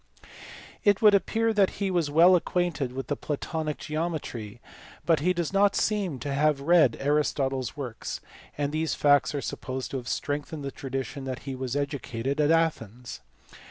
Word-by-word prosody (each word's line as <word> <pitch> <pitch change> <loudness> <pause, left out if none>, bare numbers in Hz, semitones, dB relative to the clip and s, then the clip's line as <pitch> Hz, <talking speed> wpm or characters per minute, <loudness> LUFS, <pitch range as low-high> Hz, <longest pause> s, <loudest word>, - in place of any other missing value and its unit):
It 205 +1 +3
would 210 -1 +8
appear 225 +4 +2
that 200 -3 +3
he 195 -1 -1
was 170 -5 +1
well 170 +5 +6
acquainted 175 -6 0
with 135 +1 -5
the 145 - -2
Platonic 155 +1 -3
geometry, 150 -9 -4 0.5
but 165 -2 +3
he 175 +5 +2
does 175 -1 -2
not 200 0 +4
seem 200 -9 0
to 140 +2 -3
have 150 0 +2
read 155 -4 +4
Aristotle 140 -2 +1
s 130 - -6
works; 125 -6 -5 0.4
and 145 -1 -1
these 160 +1 -1
facts 145 0 +3
are 140 - -1
supposed 130 0 -5
to 130 -2 -3
strengthen 145 +3 -3
the 140 - -4
tradition 135 +1 -5
that 130 -1 -5
he 135 - -4
was 130 0 -4
educated 140 -1 -2
at 150 - +3
Athens. 125 - 0
145 Hz, 165 wpm, -27 LUFS, 135-170 Hz, 0.5 s, would